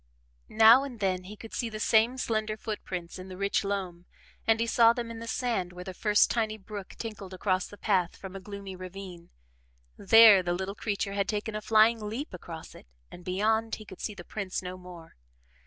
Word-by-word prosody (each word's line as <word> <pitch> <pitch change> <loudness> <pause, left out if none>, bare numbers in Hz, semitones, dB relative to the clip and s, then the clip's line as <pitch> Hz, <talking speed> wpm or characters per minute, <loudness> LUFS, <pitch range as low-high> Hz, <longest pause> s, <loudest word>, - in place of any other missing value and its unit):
Now 225 +4 +7
and 255 -5 -7
then 185 -2 -1
he 205 +3 -9
could 225 +2 -11
see 235 - -2
the 215 -1 -6
same 225 +3 +3
slender 215 -3 -1
foot 215 -1 -5
prints 175 -1 -6
in 185 - -8
the 185 -1 -9
rich 200 +1 0
loam 185 -3 -4 0.4
and 225 0 +4
he 230 - +1
saw 230 0 +5
them 235 -1 -5
in 230 - -7
the 230 - -7
sand 225 -8 -1
where 180 0 -8
the 185 0 -7
first 210 +2 +3
tiny 220 -2 -1
brook 200 -1 -9
tinkled 200 -4 -7
across 185 -1 0
the 205 - -13
path 185 -5 +1
from 190 -1 -10
a - - -5
gloomy 200 0 -8
ravine. 185 -1 -9 0.7
There 220 -1 +8
the 175 -1 -1
little 190 +2 -3
creature 200 -1 -3
had 200 -1 0
taken 210 0 -2
a 215 - -3
flying 225 +2 +4
leap 225 +5 -5
across 165 -2 -9
it - - -15 0.2
and, 175 - -11
beyond, 220 +5 0
he 215 - -12
could 190 - -12
see 210 - -4
the 175 - -10
prints 195 -3 -4
no 180 0 -5
more. 180 - -13
200 Hz, 210 wpm, -28 LUFS, 185-220 Hz, 0.7 s, There